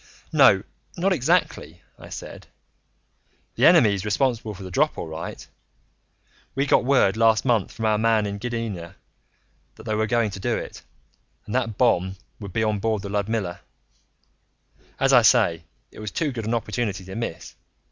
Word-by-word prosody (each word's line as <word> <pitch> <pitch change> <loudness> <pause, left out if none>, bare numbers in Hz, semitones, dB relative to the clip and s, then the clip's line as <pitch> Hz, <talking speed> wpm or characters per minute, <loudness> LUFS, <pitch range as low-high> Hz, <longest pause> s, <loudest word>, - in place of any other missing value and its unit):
"No, - - +6 0.3
not 190 +3 +2
exactly," 150 - 0 0.2
I - - -12
said. - - -9 1.1
"The - - +4
enemy's 100 -4 +5
responsible 110 0 -1
for 95 - -10
the 95 - -8
drop, - - +1
all - - -4
right. 80 +1 -7 1.1
We 135 +1 +1
got 135 - +3
word 130 -7 +3
last 115 0 +3
month 115 -6 +1
from 110 - -5
our 105 -1 +2
man 110 -1 +2
in 100 0 -4
Gdynia 115 -7 -5 0.8
that - - -13
they 110 - -3
were 110 +1 0
going 115 -2 +1
to 95 - -7
do - - -1
it, - - -8 0.6
and - - -7
that 130 -1 +2
the 115 - -6
bomb 95 -5 +1 0.2
would 100 -3 -8
be 110 - 0
on 105 -2 0
board 110 -1 -1
the 100 - -5
Ludmilla. 100 -2 -2 1.4
As 135 0 +3
I 125 - +8
say, 105 -8 +3 0.3
it - - -13
was 110 -1 -5
too 150 +7 -2
good 115 -4 -5
an 115 +2 0
opportunity 105 -4 -3
to 95 - -9
miss. 115 -6 -5
110 Hz, 170 wpm, -24 LUFS, 100-120 Hz, 1.4 s, I